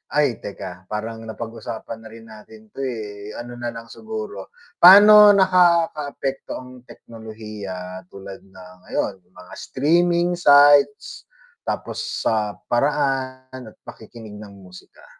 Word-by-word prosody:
ay 145 -6 +1
teka 95 -2 -9
parang 110 +1 -6
napag 115 +1 -7
usapan 115 0 -8
na 110 - -10
rin 115 0 -13
natin 110 0 -15
'to - - -13
eh. 105 -4 -7
ano 120 0 -9
nalang 115 -1 -7
siguro. 110 -3 -8 0.3
Paano 205 +3 +9
nakakaapekto 170 -7 +1
ang 125 - -11 0.2
teknolohiya 105 -5 -10
tulad 100 0 -10
ng 95 -1 -15
ngayon, - - -2
mga 90 0 -16
streaming 170 +5 +1
sites, 145 -2 +4 0.4
tapos - - -4 0.3
sa 105 -2 0 0.2
paraan 130 -2 -2
at - - -36
makikinig 110 -1 -12
ng 105 -1 -12
musika? 90 -2 -16
115 Hz, 120 wpm, -21 LUFS, 105-140 Hz, 0.4 s, Paano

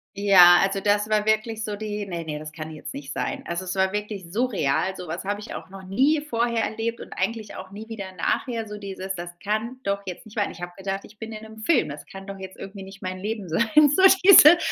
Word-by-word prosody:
Ja, 185 -3 +8
also 195 0 0
das 205 +1 +2
war 210 -1 +2
wirklich 215 +1 0
so 210 -1 -3
die: 210 0 -4
„Ne, 170 -2 -5
ne, 150 -1 -4
das 155 0 -8
kann 155 0 -7
jetzt 155 - -8
nicht 140 0 -7
sein.“ - - -3
Also, 170 +2 -4
es 185 - -3
war 190 0 +1
wirklich 210 -4 -5
surreal. 190 - 0
So 180 -1 -8
was 165 +3 -5
habe 205 +1 -2
ich 210 - -8
auch - - -8
noch 195 0 -11
nie 270 +11 +2
vorher 235 -5 0
erlebt 230 +1 -3
und - - -9
eigentlich 225 -2 -3
auch 185 0 -8
nie 215 +2 -9
wieder 200 -4 -6
nachher. 225 +6 -2
So 210 0 -7
dieses: 195 -1 -5
„Das 175 0 -8
kann 220 +5 -2
doch 200 0 -1
jetzt 180 +5 -7
nicht 220 0 -14
wahr 205 - +1
sein.“ - - -6
Ich 175 - -13
habe 175 0 -5
gedacht, 195 0 -3
ich 210 - -18
bin 225 0 -7
in 215 0 -8
'nem 220 0 -12
Film. 250 - +2
Das 145 +1 -8
kann 195 0 -10
doch 195 -1 -8
jetzt 190 0 -9
irgendwie 195 0 -8
nicht 195 +1 -12
mein 185 0 -4
Leben 205 -2 -4
sein, 215 +8 +1 0.3
so - - +3 0.2
diese 345 -4 +10
200 Hz, 255 wpm, -24 LUFS, 185-220 Hz, 0.3 s, diese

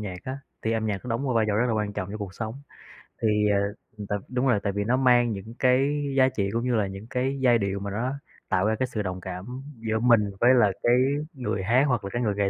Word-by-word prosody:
nhạc 95 -4 -5
á, 130 +1 -4 0.2
thì 110 - 0
âm 110 -1 -1
nhạc 100 -3 -3
nó 125 - -5
đóng 115 +3 -1
một 130 -3 0
vai 115 -1 +3
trò 105 - +1
rất 120 +3 +2
là 120 - 0
quan 105 -2 -1
trọng 100 -2 -4
trong 105 - -5
cuộc 100 -3 -6
sống. 110 0 -4 0.7
Thì, 115 - +2 0.2
à, 100 - +3 0.5
t - - -9 0.2
đúng 125 +1 0
rồi, 120 -5 +3
tại 100 - -1
vì 100 +1 -1
nó 120 +5 +1
mang 120 -2 +4
những 105 +3 -7
cái 135 +3 +2
giá 130 0 +5
trị 100 -7 -1
cũng 115 - 0
như 125 -1 +1
là 105 -3 +1
những 95 +3 -8
cái 130 +2 -1
giai 120 -2 +5
điệu 100 -2 -2
mà 100 0 -5
nó - - -5
nó 130 - -1 0.4
tạo 95 - +2
ra 110 +1 +2
cái 130 - +1
sự 110 -4 -3
đồng 95 -2 -4
cảm 90 0 -6 0.3
giữa 110 -1 -1
mình 115 -4 +4
với 125 +2 +6
là 110 -5 +5
cái 120 - +4 0.4
người 125 -8 -3
hát 120 +7 +4
hoặc 125 -4 0
là 100 - -4
cái 120 - -1
người 105 -4 0
nghệ 100 -1 +1
110 Hz, 280 wpm, -26 LUFS, 100-125 Hz, 0.7 s, với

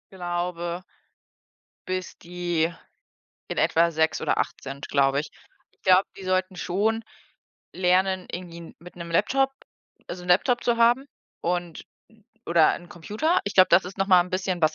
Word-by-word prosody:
Glaube 175 -1 -3 1.0
bis 185 0 -4
die 175 -1 -1 0.8
in - - -4
etwa 170 +1 +3
6 160 0 +1
oder - - 0
8 170 - -2
sind, 135 +1 -7
glaube 140 0 +2
ich. 155 - -8 0.4
Ich - - -38
glaube, 185 +1 +5
die 195 - -9
sollten 185 0 0
schon 215 +6 -1 0.7
lernen, 185 0 +1
irgendwie 175 -1 -7
'n 170 - -12
mit 175 +1 -13
'nem 170 -1 -7
Laptop 270 +10 +2 0.6
also 180 +1 -6
'n - - -10
Laptop 240 +7 +3
zu 240 -1 +2
haben 240 +4 +4 0.4
und 175 -1 -3 0.6
oder 170 -2 +4
'n 175 - -10
Computer. 215 - -1
Ich 200 - -4
glaube, 185 -1 +7
das 175 +2 +5
ist 185 +2 -9
noch 195 - +1
mal 185 -2 +7
'n 180 - -12
bisschen 185 -1 -2
was 155 0 +3
180 Hz, 165 wpm, -25 LUFS, 170-190 Hz, 1.0 s, glaube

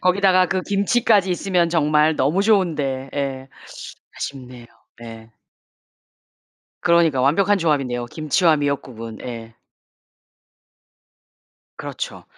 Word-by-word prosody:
거기다가 185 0 +3
그 185 - -1
김치까지 200 -1 +2
있으면 180 -1 0
정말 155 -1 +2
너무 150 +8 +1
좋은데 150 -11 0
예 135 -1 -4 0.7
아쉽네요. 125 -3 -8 0.3
네. 115 -1 -11 1.5
그러니까 170 -6 +3
완벽한 195 +9 +2
조합인데요 135 -7 -1
김치와 155 +4 +1
미역국은. 130 -6 -4
예. 115 -2 -8 2.2
그렇죠. - - -7
150 Hz, 235 characters per minute, -21 LUFS, 130-185 Hz, 2.2 s, 거기다가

